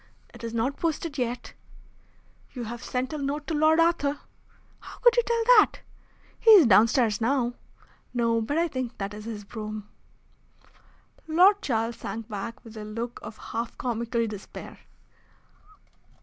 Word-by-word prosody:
"It 235 -1 -13
is 230 - -4
not 235 +5 -1
posted 320 -2 -2
yet." 245 0 -3 1.0
"You 245 - -5
have 235 +1 -7
sent 255 +3 -3
a 305 - -3
note 285 +2 -3
to - - -3
Lord 310 +1 +4
Arthur." 330 -4 +2 0.6
"How - - -12
could 485 -1 +5
you 480 - +5
tell 465 -1 0 0.2
that?" - - +2 0.6
"He 465 - +3
is 405 -8 +10
downstairs 225 +1 +4
now." 245 0 +1 0.6
"No; 230 -2 +1
but 285 +8 -2
I 340 +1 +2
think 255 -5 -5
that 200 0 -4
is 210 +1 -9
his 220 -2 -6
brougham." 215 0 -7 1.4
Lord 370 +6 +5
Charles 230 - -1
sank 225 -1 -6
back 220 +1 -6
with 225 -1 -11
a 215 - -6
look 230 +3 -5
of 220 - -9
half 230 +1 -5
comical 235 -1 -1
despair. 210 -3 -9
240 Hz, 150 wpm, -26 LUFS, 225-295 Hz, 1.4 s, is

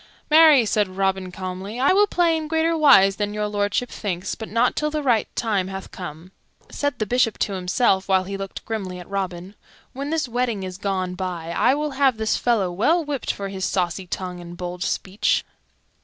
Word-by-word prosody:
"Marry," 305 -6 +7
said 210 -1 +1
Robin 190 -1 -1
calmly, 190 +5 -6
"I 275 +7 +4
will 410 +2 +5
play 345 -4 +2
in 315 -1 -3
greater 325 +1 +1
wise 200 -11 +6
than 205 0 -2
Your 210 0 -1
Lordship 205 +4 -1
thinks, 185 -4 -3
but 220 - -7
not 230 +3 +2
till 300 - 0
the 300 0 -3
right 240 -5 +2
time 205 -5 0
hath 190 0 -7
come." 175 0 -8 0.4
Said 285 -3 -2
the 215 - -1
Bishop 230 0 +1
to 205 - -1
himself, 190 +1 +1
while 190 -1 +4
he 195 +1 -5
looked 195 0 -7
grimly 195 -5 -4
at 180 - -10
Robin, 190 -1 -4 0.4
"When 275 +2 -4
this 315 -3 0
wedding 240 -4 -1
is 185 0 -6
gone 190 -2 -2
by 180 -3 -4
I 255 +9 +3
will 300 0 -2
have 265 -3 +2
this 220 0 0
fellow 215 -7 +1
well 310 - +2
whipped 285 -4 -2
for 200 -1 -5
his 190 -1 -5
saucy 180 0 -1
tongue 180 0 -5
and 175 0 -10
bold 180 0 -6
speech." 195 +1 0
205 Hz, 200 wpm, -23 LUFS, 185-255 Hz, 0.4 s, Marry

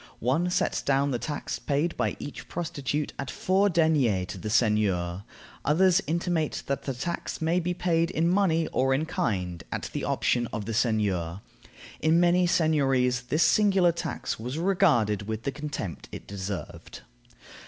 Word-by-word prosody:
One 145 +9 +1
sets 180 - 0
down 140 +1 +1
the 120 - -1
tax 145 +2 -4
paid 150 +4 -1
by - - -1
each 145 - -8
prostitute 150 -3 -3
at 135 -2 -4
four 195 +7 +2
deniers 150 - +2
to - - -6
the 110 - -4
seigneur. 100 -5 +1 0.4
Others 185 +4 +4
intimate 165 -1 -1
that 140 - -3
the 135 - -2
tax 170 +8 -4
may 165 +3 +1
be 180 +1 -2
paid 170 -2 +1
in 165 -2 0
money 175 -3 +2
or 135 +1 +2
in 150 +4 0
kind, 95 - -2
at - - -4
the - - -3
option 120 -1 +1
of 105 -2 -4
the 115 - -3
seigneur. 100 -7 0 0.6
In 160 +2 +3
many 175 +1 +4
seigniories 135 -7 +2
this 155 +5 +2
singular 190 0 +4
tax 170 -8 -4
was 125 +6 -4
regarded 145 - +2
with 110 0 -4
the 140 - -1
contempt 145 - -6
it - - -8
deserved. 100 -1 -6
145 Hz, 160 wpm, -27 LUFS, 115-170 Hz, 0.6 s, Others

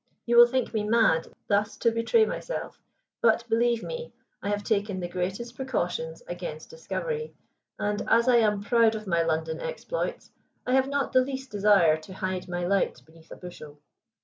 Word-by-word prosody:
You 235 - +1
will 240 0 +10
think 255 -1 -1
me 215 - 0
mad 215 -7 +3 0.2
thus 205 +1 +1
to 230 - +2
betray 230 - +3
myself, - - -5 0.4
but, 230 0 +3
believe 235 0 +1
me, 485 0 -6 0.3
I 200 - -3
have 205 0 -1
taken 205 -3 -1
the 175 - -3
greatest 190 +7 -4
precautions 175 -11 -3
against 175 -3 -6
discovery, 480 -1 -4 0.4
and 205 0 -1
as 235 +2 +4
I 245 -1 +6
am 210 -3 +2
proud 225 +1 +3
of 215 0 -6
my 170 -3 +1
London 160 -1 -1
exploits, - - -4 0.3
I 250 - 0
have 265 0 +4
not 280 -2 -1
the 255 - +6
least 265 0 -5
desire 200 -6 +4
to 170 +4 -12
hide 185 -1 -3
my 175 0 -2
light 195 +2 +1
beneath 160 0 -20
a - - -9
bushel. 155 -5 -11
215 Hz, 175 wpm, -27 LUFS, 180-240 Hz, 0.4 s, will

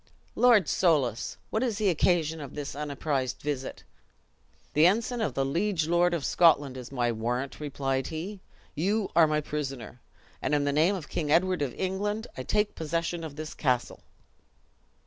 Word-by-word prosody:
"Lord 235 -8 +5
Soulis! 140 - +1
what 220 - 0
is 235 -5 0
the 210 -2 +2
occasion 160 -2 +1
of 140 - -8
this 145 -2 -5
unapprised 140 -3 -2
visit?" 140 -3 -4 0.9
"The 155 +3 +6
ensign 230 +5 0
of 220 - -1
the 135 - +1
liege 170 +3 0
lord 175 +1 +3
of 155 - -3
Scotland 145 -6 +4
is 130 -1 -8
my 120 -3 0
warrant!" 120 +4 -3
replied 135 -2 -2
he; 180 +6 -5 0.3
"you 200 +6 0
are 165 -1 +7
my 150 0 +1
prisoner; 135 -6 -5 0.4
and 150 - +1
in 145 - +1
the 145 0 0
name 165 +7 +3
of 165 -5 -6
King 150 -3 -2
Edward 185 +1 +3
of 135 -4 -2
England, 205 +4 -2
I - - -5
take 210 +10 0
possession 165 +1 -2
of 155 -3 -7
this 155 +1 -6
castle." 125 -4 -1
155 Hz, 165 wpm, -28 LUFS, 140-185 Hz, 0.9 s, are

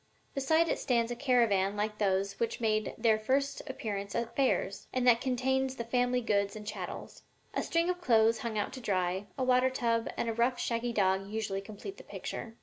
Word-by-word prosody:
Beside 315 +4 +2
it - - 0
stands 235 -3 +1
a - - -2
caravan 230 -7 +2
like 210 +1 -2
those 195 -1 0
which 230 - -1
make 215 -2 0
their 220 -1 +3 0.5
appearance 200 -6 -4
at 235 0 -2
fairs, 250 -7 0
and 255 -1 0
that 235 -2 +6
contains 265 +1 0
the 235 - -4
family 245 +1 +1
goods 200 -3 0
and 210 -1 -8
chattels. 210 - -6 0.3
A - - 0
string 335 0 +1
of 360 0 -1
clothes 225 -4 +4
hung 225 -1 -3
out 205 - -1
to 260 - -7
dry, 190 -2 -1
a 260 - 0
water 255 0 +4
tub 230 -3 0
and - - -1
a 230 - 0
rough, 240 +2 +1
shaggy 235 +1 -1
dog 195 -3 +1
usually 210 -2 -2
complete 215 - -9
the - - -11
picture.'" 225 -1 -6
230 Hz, 195 wpm, -31 LUFS, 210-255 Hz, 0.5 s, that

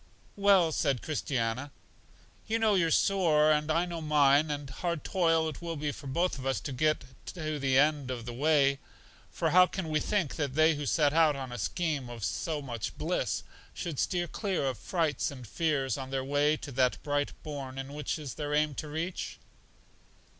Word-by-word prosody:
Well, 195 -5 +4
said 135 -4 0
Christiana, 130 -3 -2 0.8
you 225 - +1
know 220 -2 +3
your 170 -4 +3
sore, 160 -5 +3
and 150 0 +1
I 165 +3 +2
know 170 -2 -5
mine, 150 0 +4
and 145 -1 -3
hard 170 +4 -3
toil 165 -4 +1
will 170 -1 -4
it 155 - -6
be 145 0 -1
for 140 - -9
both 170 +3 0
of 130 - -7
us 135 - +1
to - - -5
get 155 +4 +1 0.3
to 155 -3 -3
the 135 -1 +2
end 145 -2 +3
of 120 -3 -4
the 120 - -5
way; 140 0 +3 0.5
for - - -1
how 180 +1 +7
can 185 -4 -4
we 155 -1 +1
think 190 -4 -1
that 140 -4 -2
they 155 +1 +5
who 145 -2 -4
set 150 -1 +3
out 160 -2 +4
on 135 -2 -6
a 120 - -5
scheme 155 -8 -2
of 120 -3 -8
so 145 - -2
much 120 -5 -5
bliss, - - -1 0.3
should 165 -6 -4
steer 175 -1 0
clear 190 -8 -2
of 130 -3 -2
frights 160 -6 0
and 130 -3 -9
fears 140 +1 0
on 130 -1 -6
their 135 -1 -2
way 145 +2 +2
to 140 - -8
that 130 -1 +2
bright 145 -1 -1
bourn 135 -2 -6
which 150 +3 -3
it 155 - -8
is 135 - -5
their 150 -1 -2
aim 150 0 +2
to 150 - -5
reach? 160 +4 -4
150 Hz, 195 wpm, -30 LUFS, 135-165 Hz, 0.8 s, how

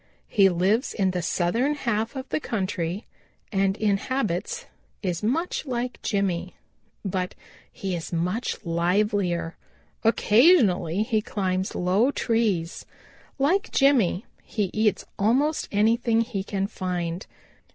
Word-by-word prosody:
He 195 -3 +5
lives 190 +8 +1
in 190 -3 +2
the 180 -1 -2
southern 210 - +1
half 230 -3 -1
of 265 0 -5
the - - 0
country 190 - -2 0.5
and 195 -1 +1
in 205 -2 +2
habits 210 -6 -2 0.4
is 180 -3 -1
much 295 +12 0
like 245 -1 -3
Jimmy, 190 -3 -1 0.5
but 185 -1 -2 0.4
he 190 -2 -3
is 165 - -6
much 180 +7 -1
livelier. 175 0 0 0.5
Occasionally 215 - +4
he 220 -2 +1
climbs 190 -3 -2
low 190 +8 +2
trees. 220 -11 0 0.5
Like 360 +10 +1
Jimmy 250 -9 +3 0.2
he 205 -5 -2
eats 215 -1 +1
almost 265 +9 +2
anything 225 +2 +3
he 220 -5 -3
can 195 -1 -2
find. 180 -3 -3
205 Hz, 120 wpm, -25 LUFS, 180-235 Hz, 0.5 s, He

